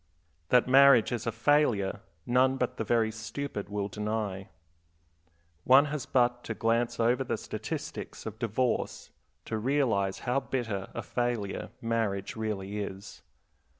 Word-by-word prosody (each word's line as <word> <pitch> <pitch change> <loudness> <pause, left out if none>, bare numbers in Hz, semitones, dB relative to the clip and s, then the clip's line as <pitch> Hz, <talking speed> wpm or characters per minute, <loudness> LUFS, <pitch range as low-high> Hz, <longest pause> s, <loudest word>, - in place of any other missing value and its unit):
That 125 -1 +4
marriage 135 -2 +6
is 120 -2 -3
a - - +1
failure 115 -5 +2 0.3
none 130 +2 +3
but 125 -2 -2
the - - -1
very 110 0 +2
stupid 110 0 -5
will 100 -1 -2
deny. 105 -1 -3 1.1
One 135 +3 +7
has 150 - -4
but 120 -1 +2
to 110 - -4
glance 115 +2 0
over 120 +3 +2
the - - -2
statistics - - -6
of 110 -1 -6
divorce 115 +2 -1 0.3
to 110 - -3
realize 115 -6 +1
how 125 +2 +2
bitter 115 -8 -3
a - - -3
failure 120 -7 -2
marriage 110 -4 -1
really 105 -2 -3
is. 100 0 -7
115 Hz, 135 wpm, -29 LUFS, 105-125 Hz, 1.1 s, One